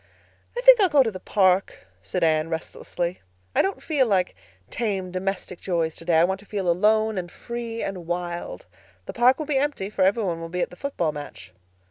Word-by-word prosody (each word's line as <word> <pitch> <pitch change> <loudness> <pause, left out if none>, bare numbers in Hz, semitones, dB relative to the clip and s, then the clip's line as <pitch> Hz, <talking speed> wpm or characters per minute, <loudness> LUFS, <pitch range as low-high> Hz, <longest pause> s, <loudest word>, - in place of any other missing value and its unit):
"I - - 0
think - - +8
I'll 380 - +5
go 290 -3 +5
to 225 - -1
the 185 - -8
park," 190 - +1 0.2
said 170 - -3
Anne 155 0 +2
restlessly. 170 +2 -4 0.3
"I - - +5
don't 390 - -2
feel 285 -6 +2
like 185 -4 +1 0.4
tame 195 -5 -2
domestic 185 -1 -3
joys 165 -3 -1
today. 165 -1 0
I 165 - +6
want 190 +2 0
to 200 - -16
feel 200 -3 -3
alone 215 +4 +3
and 175 -1 -7
free 235 -1 -5
and 185 -4 -5
wild. 175 0 -4 0.4
The - - -6
park 250 +2 +4
will 310 - -4
be 285 -2 +1
empty, 270 -9 -2
for 200 - -3
every 200 +4 +3
one 170 -4 -2
will 165 - -6
be 180 +1 -2
at - - -1
the - - -11
football 180 - -2
match." 145 -10 -9
190 Hz, 205 wpm, -24 LUFS, 175-230 Hz, 0.4 s, think